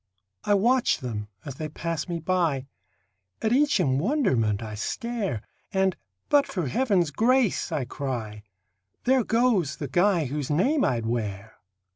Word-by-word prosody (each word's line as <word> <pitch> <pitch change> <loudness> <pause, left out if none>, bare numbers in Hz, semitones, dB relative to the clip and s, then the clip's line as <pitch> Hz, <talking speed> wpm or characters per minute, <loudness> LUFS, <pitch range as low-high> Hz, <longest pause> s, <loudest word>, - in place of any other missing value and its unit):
I 205 - +4
watch 240 +5 +3
them 110 -5 -5 0.2
as 135 -3 -7
they 155 -1 -4
pass 165 0 -3
me 170 - -1
by; 165 -6 0 0.7
At 220 +1 +1
each 285 -4 +3
in 135 -6 +2
wonderment 130 - +1
I 110 -1 -6
stare, 205 - -3 0.3
And, 190 -1 +2 0.3
"but 285 -1 +4
for 180 -5 -2
heaven's 180 - +1
grace," 240 - +2
I 135 - -1
cry, 120 -6 -5 0.6
"There 260 0 +3
goes 225 - +2
the 145 - -5
guy 175 +2 +2
whose 140 +1 -3
name 260 - +2
I'd 115 -3 0
wear!" 110 -2 -3
165 Hz, 145 wpm, -26 LUFS, -, 0.7 s, I